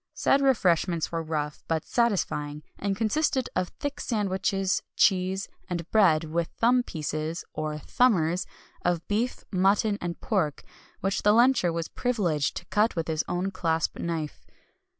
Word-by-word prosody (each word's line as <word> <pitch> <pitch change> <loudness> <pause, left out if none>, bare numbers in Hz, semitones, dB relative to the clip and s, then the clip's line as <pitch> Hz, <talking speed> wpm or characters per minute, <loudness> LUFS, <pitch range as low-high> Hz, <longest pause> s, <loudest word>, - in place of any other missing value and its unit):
Said 275 - +3
refreshments 180 - +2
were 165 -1 -1
rough, 150 -2 -3
but 160 -1 -1
satisfying, 150 -10 0 0.2
and 195 -1 -1
consisted 260 +4 +1
of 185 0 +1
thick 285 0 -3
sandwiches, 195 -3 0
cheese, 190 0 +2 0.2
and 170 -2 -3
bread, 175 -8 +5
with 165 +1 -1
"thumb 245 +2 +4
pieces" 155 -4 -4
(or 155 0 -3
"thumbers") 180 - +2 0.4
of 175 -1 0
beef, 225 +5 -1
mutton, 200 +2 +2
and 170 -1 -4
pork, 150 -2 -1 0.4
which 195 +1 0
the 210 - +5
luncher 235 -6 +4
was 165 0 -3
privileged 180 - 0
to - - -7
cut 210 +1 +1
with 165 -2 -2
his 160 -1 0
own 180 +2 -1
clasp 165 -3 -1
knife. 165 -3 -4
180 Hz, 145 wpm, -27 LUFS, 160-210 Hz, 0.4 s, bread